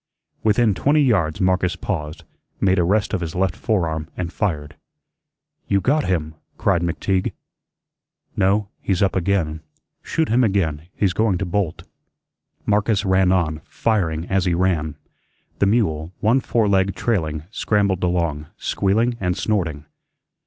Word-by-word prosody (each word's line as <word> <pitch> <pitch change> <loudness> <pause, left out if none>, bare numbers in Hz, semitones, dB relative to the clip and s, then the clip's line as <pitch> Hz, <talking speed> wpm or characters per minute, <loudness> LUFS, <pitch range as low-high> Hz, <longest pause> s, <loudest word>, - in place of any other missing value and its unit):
Within 110 0 +3
twenty 145 +9 +3
yards 90 - +1
Marcus 90 -1 +1
paused, 75 -5 -4 0.4
made 95 -1 +3
a - - +4
rest 105 +5 +1
of 95 - 0
his 80 0 -4
left 95 -1 +1
forearm 80 -8 -1
and 90 -1 -3
fired. 75 -7 -2 0.9
"You 100 - +2
GOT 145 +8 +1
him," 80 -4 -1 0.2
cried 85 - +2
McTeague. 95 +2 -1 1.0
"No, 100 +1 +2
he's 95 -1 +1
up 95 - +1
again. 85 -4 0 0.4
Shoot 160 -1 -1
him 125 +3 +3
again. 85 -7 0
He's 95 -3 +1
going 110 -3 +2
to 95 - -2
bolt." 90 -2 -2 0.8
Marcus 105 -1 +1
ran 95 -1 +3
on, 80 -4 +1
firing 90 -6 -1
as 95 0 0
he 90 -2 +2
ran. 85 -4 0 0.6
The 100 - +3
mule, 85 -8 +1
one 115 +5 +3
foreleg 100 -6 +1
trailing, 80 -10 -1
scrambled 100 -5 +1
along, 85 -4 0
squealing 115 +5 +1
and 90 -1 -1
snorting. 80 -9 -1
95 Hz, 140 wpm, -21 LUFS, 85-105 Hz, 1.0 s, a